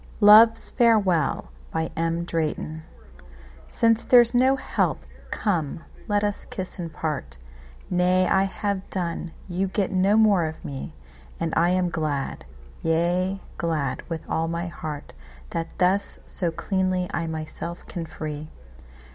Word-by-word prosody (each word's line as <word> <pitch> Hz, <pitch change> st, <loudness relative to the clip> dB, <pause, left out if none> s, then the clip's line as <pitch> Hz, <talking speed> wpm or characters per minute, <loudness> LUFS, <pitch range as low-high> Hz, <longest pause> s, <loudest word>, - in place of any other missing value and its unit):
Love's 220 Hz, +2 st, +7 dB
Farewell 195 Hz, -, +2 dB, 0.2 s
SINCE 160 Hz, -, -2 dB
there's 240 Hz, -1 st, +6 dB
no 260 Hz, +2 st, +4 dB
help, -, -, -1 dB, 0.3 s
come 165 Hz, -6 st, -1 dB, 0.2 s
let 205 Hz, 0 st, +1 dB
us 205 Hz, -1 st, -1 dB
kiss 185 Hz, 0 st, -6 dB
and 170 Hz, -2 st, -4 dB
part,—Nay 100 Hz, -, -2 dB
I 190 Hz, +2 st, +3 dB
have 195 Hz, 0 st, -3 dB
done, 175 Hz, -2 st, -3 dB, 0.2 s
you 185 Hz, +1 st, -1 dB
get 195 Hz, +1 st, -1 dB
no 195 Hz, +3 st, +3 dB
more 205 Hz, -6 st, +5 dB
of 160 Hz, 0 st, -6 dB
me; 70 Hz, -1 st, -6 dB, 0.4 s
And 165 Hz, -1 st, -2 dB
I 170 Hz, +2 st, +4 dB
am 180 Hz, 0 st, +2 dB
glad, 145 Hz, -, -2 dB, 0.4 s
yea, 175 Hz, +4 st, +1 dB, 0.2 s
glad 155 Hz, -5 st, -1 dB
with 165 Hz, -2 st, -5 dB
all 165 Hz, 0 st, 0 dB
my 170 Hz, +1 st, -2 dB
heart, 155 Hz, -4 st, -6 dB, 0.4 s
That 165 Hz, 0 st, -2 dB
thus 190 Hz, +3 st, +2 dB
so 175 Hz, -3 st, -1 dB
cleanly 185 Hz, +1 st, -1 dB
I 170 Hz, -1 st, -1 dB
myself 160 Hz, +2 st, -5 dB
can 170 Hz, -2 st, -5 dB
free. 155 Hz, -1 st, -6 dB
170 Hz, 120 wpm, -25 LUFS, 155-195 Hz, 0.4 s, Love's